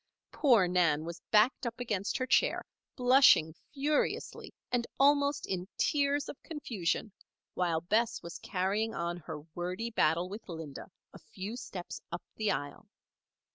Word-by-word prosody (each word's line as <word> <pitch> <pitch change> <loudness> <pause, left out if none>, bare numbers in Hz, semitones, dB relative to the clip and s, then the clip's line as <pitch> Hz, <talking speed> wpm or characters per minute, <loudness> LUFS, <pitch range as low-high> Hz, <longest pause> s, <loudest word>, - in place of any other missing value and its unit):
Poor 235 - +4
Nan 170 -4 +2
was 170 +1 -7
backed 230 +4 +4
up 235 +1 -5
against 210 -5 -1
her 255 - -1
chair, 255 - +2 0.3
blushing 250 - +6 0.2
furiously 295 +1 -1 0.2
and 240 -1 0
almost 285 +1 +3
in 185 -1 -3
tears 285 -1 +1
of - - -9
confusion, 220 - -2 0.4
while 170 -3 0
Bess 225 +6 0
was 170 0 -7
carrying 200 +4 -1
on 170 +1 -2
her 155 -2 -7
wordy 180 +7 -3
battle 170 -4 +2
with 205 +2 -9
Linda, 160 -3 -7 0.2
a - - -11
few 200 +4 -7
steps 185 -7 -7
up 170 - -5
the 215 -2 0
aisle. 145 -4 -4
205 Hz, 140 wpm, -31 LUFS, 175-250 Hz, 0.4 s, blushing